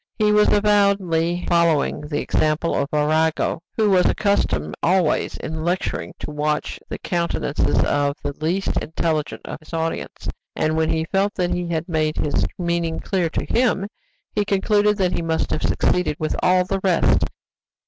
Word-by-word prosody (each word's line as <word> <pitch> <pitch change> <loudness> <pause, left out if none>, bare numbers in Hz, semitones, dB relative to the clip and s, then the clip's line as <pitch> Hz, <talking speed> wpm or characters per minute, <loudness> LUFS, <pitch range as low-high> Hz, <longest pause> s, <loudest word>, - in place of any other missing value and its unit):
He 210 -1 +3
was 210 0 +4
avowedly 200 -5 +2
following 170 -4 +2
the 150 0 -3
example 155 +2 0
of 140 - 0
Arago, 155 +2 +1 0.2
who 215 -2 +3
was 180 -2 +4
accustomed 80 - 0
always 180 -2 +1
in 160 0 -5
lecturing 175 +2 -2
to - - -6
watch 150 0 -2
the - - -4
countenance 170 -4 -2
of 145 0 +2
the 145 0 -3
least 185 +5 0
intelligent 160 -1 -2
of - - -6
his 155 +1 -17
audience, 165 0 -3 0.3
and 155 0 0
when 160 0 +1
he 160 0 0
felt 195 +3 0
that 180 -2 0
he 180 -1 -2
had 165 -1 -2
made 155 -3 0
his 150 - 0
meaning 170 -2 -1
clear 180 -4 -1
to - - -3
him, 225 -5 +1 0.5
he 210 - +1
concluded 205 +1 +2
that 185 -3 +1
he - - -1
must 165 -1 -1
have - - -1
succeeded 180 -4 +1
with 155 - -1
all 180 0 +3
the 195 +1 -1
rest. 180 -4 +3
170 Hz, 165 wpm, -22 LUFS, 155-195 Hz, 0.5 s, was